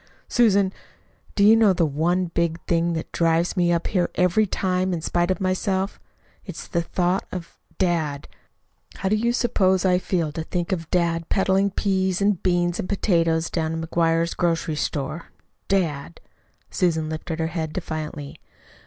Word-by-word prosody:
"Susan, 200 -5 +3 0.6
do 200 - +3
you 215 +2 +8
know 220 -4 +5
the 175 -2 +2
one 165 +5 +1
big 170 -1 -1
thing 170 0 +1
that 160 - -4
drives 165 +1 +1
me 175 -2 +2
up 170 -1 0
here 180 -4 0
every 180 +4 +3
time, 185 0 0
in 170 - -1
spite 175 +2 0
of 185 - 0
myself? 190 +1 -1 0.4
It's - - -8
the 170 -4 0
thought 180 +2 -1
of 180 -2 -7 0.2
dad. 160 -6 0 0.7
How 190 - -2
do 215 - +3
you 235 +2 +1
suppose 195 -7 +2
I 180 -1 +4
feel 170 -5 -1
to 160 +2 -4
think 175 +3 -3
of 165 -4 -3
dad 170 -2 0
peddling 195 0 +2
peas 190 -2 0
and 200 -2 +1
beans 175 -1 +1
and - - -4
potatoes 165 -5 +1
down 165 -1 -1
to 165 - -4
McGuire's 165 0 +1
grocery 165 -2 0
store? 150 +2 -3 0.4
dad!" 150 - -1 0.5
Susan 160 -3 +1
lifted 160 +1 -4
her 160 -1 -1
head 160 -3 -2
defiantly. 155 -4 -5
175 Hz, 160 wpm, -23 LUFS, 165-190 Hz, 0.7 s, you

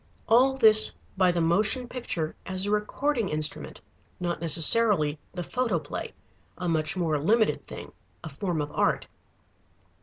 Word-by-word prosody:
All 255 +4 +4
this 215 -3 +5 0.2
by 185 -2 +3
the 175 -1 -1
motion 210 +9 +1
picture 175 -11 -4
as 185 +1 -1
a 205 - -2
recording 220 +2 -1
instrument, 155 0 -2 0.4
not 175 -1 -3
necessarily 165 -1 +3
the 180 -1 -5
photoplay, 250 +5 -3 0.4
a 180 - -4
much 160 +1 -1
more 160 -4 0
limited 215 +9 +1
thing, - - -9 0.3
a 160 - -6
form 165 +2 -3
of 145 - -7
art. - - 0
185 Hz, 140 wpm, -26 LUFS, 160-225 Hz, 0.4 s, this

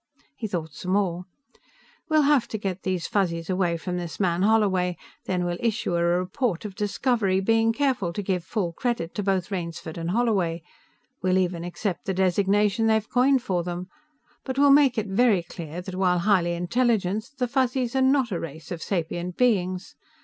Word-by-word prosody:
He 225 - -4
thought 165 -6 -4
some 185 +5 -3
more. 180 -3 0 0.8
"We'll 310 -1 +4
have 285 -3 +3
to 220 - -4
get 195 -3 -4
these 185 -3 -2
Fuzzies 170 -3 -1
away 180 -2 +1
from 180 +2 -4
this 175 -2 -6
man 175 -3 +1
Holloway. 195 -4 +2 0.3
Then 180 -1 -1
we'll 175 0 -2
issue 230 -5 -1
a 170 - +1
report 180 +4 0
of 205 - -5
discovery, 205 -1 0
being 225 +3 +3
careful 245 -8 0
to 205 - -3
give 185 -2 -1
full 180 -6 -2
credit 230 -6 -2
to 210 - -2
both 195 -1 0
Rainsford 170 -3 -5
and 165 0 -3
Holloway 185 -7 0 0.6
we'll 185 0 +2
even 180 -2 0
accept 175 +1 -4
the 190 - -1
designation 200 +4 +2
they've 220 0 +2
coined 260 0 +3
for 185 -7 0
them 175 +1 -5 0.5
but 260 -1 -4
we'll 285 0 +6
make 275 -4 +5
it 220 - 0
very 205 -2 +3
clear 170 0 -7
that 185 +1 -8
while 185 -1 +2
highly 175 -2 +2
intelligent, 215 +3 0
the 250 - 0
Fuzzies 255 -1 0
are 265 - +3
not 260 -3 +3
a 175 - -1
race 160 +1 -8
of 170 -2 -4
sapient 175 -1 -3
beings. 185 -7 +1
190 Hz, 180 wpm, -25 LUFS, 175-225 Hz, 0.8 s, we'll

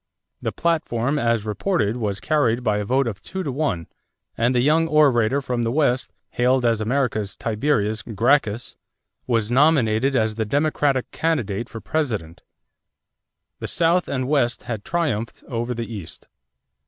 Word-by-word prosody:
The - - -2
platform 150 -5 0
as 115 -4 +1
reported 105 - 0
was 105 -5 -2
carried 125 -6 +1
by 105 -3 +1
a - - -1
vote 130 +5 +2
of 110 -5 -4
two 190 0 -5
to 145 - -2
one 130 - -1 0.5
and 120 +3 +1
the - - +4
young 160 +5 +3
orator 140 -4 +3
from 125 -2 -1
the 115 0 0
West, 130 -3 +1 0.2
hailed 125 +1 +2
as 115 -2 +2
America's 110 -4 -1
Tiberius 110 -2 0
Gracchus, 115 0 +1 0.5
was 115 -2 0
nominated 135 -3 +3
as 110 -3 +2
the 110 +1 -1
Democratic 145 +1 0
candidate 120 -9 -1
for 115 - -8
President. 110 - -2 1.2
The - - -4
South 170 +2 +2
and 130 -2 -2
West 135 -5 +1
had 115 -5 -5
triumphed 140 -10 -2
over 120 0 -3
the 115 0 -3
East. 95 -7 -8
120 Hz, 150 wpm, -22 LUFS, 110-145 Hz, 1.2 s, the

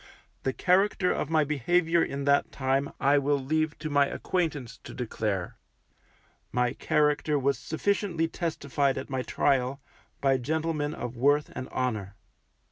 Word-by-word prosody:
The 135 - 0
character 185 +4 +2
of 150 - -2
my 160 -1 +3
behaviour 165 +4 +2
in 140 0 -3
that 140 0 +2
time 135 +1 0
I 145 +1 +4
will 140 +1 +1
leave 155 +3 -1
to 155 +1 -5
my 145 -1 +4
acquaintance 150 -10 -2
to - - -9
declare; 105 -6 -3 0.9
my 125 0 +1
character 150 0 +1
was 140 -2 +1
sufficiently 165 +3 0
testified 145 -5 -1
at 130 - -6
my 130 -1 -1
trial, 135 0 +1 0.4
by 135 -1 +3
gentlemen 155 +2 -1
of 120 0 -5
worth 145 +4 +2
and 130 - -5
honour. 110 -6 -2
140 Hz, 140 wpm, -28 LUFS, 130-155 Hz, 0.9 s, I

